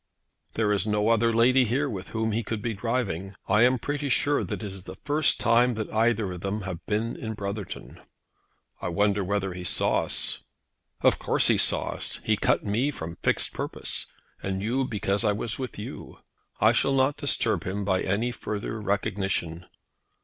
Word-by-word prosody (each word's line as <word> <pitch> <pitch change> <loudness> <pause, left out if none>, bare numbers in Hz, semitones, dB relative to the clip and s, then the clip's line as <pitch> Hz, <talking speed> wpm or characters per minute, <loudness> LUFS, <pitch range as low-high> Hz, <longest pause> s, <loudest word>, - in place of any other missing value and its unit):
"There 110 -2 +1
is 100 0 0
no 105 +1 +1
other 115 0 +3
lady 125 +3 +5
here 130 +5 0
with 100 -7 -6
whom 110 0 -1
he 110 +2 0
could 110 -1 -4
be 115 +2 -2
driving. 100 -4 -2
I 105 +2 +4
am 125 +2 +5
pretty 145 +2 -3
sure 145 +3 +2
that - - -5
it 100 -2 -5
is 95 -1 -7
the 95 - -8
first 150 +2 +2
time 120 +1 +4
that 110 0 -4
either 110 -3 +2
of 90 -1 -7
them 100 +3 -2
have 90 -3 -6
been 110 +3 -1
in 110 -1 -5
Brotherton." 100 -1 -6 0.8
"I - - -2
wonder 100 +3 +1
whether 95 0 -1
he 90 0 -7
saw 90 - +2
us." - - 0 0.6
"Of - - +4
course - - +3
he - - +4
saw - - +3
us. - - -1
He 110 - +2
cut - - +1
me 110 +7 +1
from 85 - -6
fixed - - +2
purpose, - - -2 0.3
and 95 0 -3
you 130 +5 0
because 100 -3 0
I 105 -2 +3
was 110 +3 -3
with 130 -3 -5
you. 105 - -8 0.4
I - - +6
shall 135 - +2
not 135 +2 +2
disturb 145 -1 +1
him 100 +2 -3
by 95 -2 +1
any 110 +6 0
further 110 -1 -4
recognition." 95 -4 -2
105 Hz, 185 wpm, -26 LUFS, 100-120 Hz, 0.8 s, I